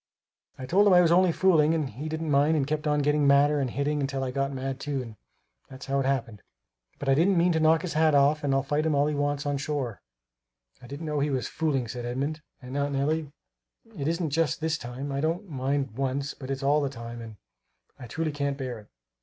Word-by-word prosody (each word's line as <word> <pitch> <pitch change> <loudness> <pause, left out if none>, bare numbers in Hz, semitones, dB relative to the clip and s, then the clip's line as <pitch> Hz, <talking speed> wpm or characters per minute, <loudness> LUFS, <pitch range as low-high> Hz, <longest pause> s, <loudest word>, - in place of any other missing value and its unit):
I 130 - -6
told 195 +9 +4
him 195 - +6
I 180 - +7
was 170 -2 +3
only 180 0 +5
fooling, 165 -3 +3
but 140 -4 -3
he 145 +8 -6
didn't 160 0 -3
mind 145 +3 +3
and 140 - +1
kept 155 +1 -2
on 150 -1 +2
getting 150 0 +2
madder 145 +1 +4
and 135 -2 -1
hitting 140 +2 -1
till 135 -1 -3
I 130 - -2
got 140 +1 -1
mad 135 -1 -4
too 145 -1 -3
and 115 -3 -10 0.5
that's 130 0 -10
how 140 0 0
it 135 - 0
happened. 115 -6 -2 0.6
But 140 - -6
I 135 - +5
didn't 175 +6 +3
mean 175 +1 +4
to 160 - +1
knock 160 0 +4
his 180 - -3
hat 155 -1 +3
off, 145 +2 +3
and 140 - 0
I'll 135 0 +2
fight 145 +2 0
him 155 - +1
all 140 +1 +3
he 150 - 0
wants 145 0 -1
on 145 -1 -1
shore." 135 - -3 0.8
"I 120 - -12
didn't 145 +5 -7
know 150 -1 -1
he 145 +1 +1
was 130 -3 -1
fooling," 145 -6 -1
said 120 +2 -6
Edmund, 140 +6 -3 0.2
"and 125 +2 -7
Aunt 145 0 -1
Nellie, 145 +2 -1 0.6
it 140 -5 -3
isn't 165 -1 -1
just 160 -1 +1
this 160 0 -1
time; 125 +4 -6
I 140 0 -2
don't 165 +6 -1
mind 135 -2 -2
once; 135 +2 -2
but 130 -2 -10
it's 135 0 -3
all 145 +2 +3
the 140 - -1
time 115 -2 -8
and 115 -1 -9
and - - -20 0.6
I 125 - -8
truly 160 +6 -2
can't 140 -1 -2
bear 130 -4 -5
it!" 105 - -16
145 Hz, 245 wpm, -27 LUFS, 135-155 Hz, 0.8 s, I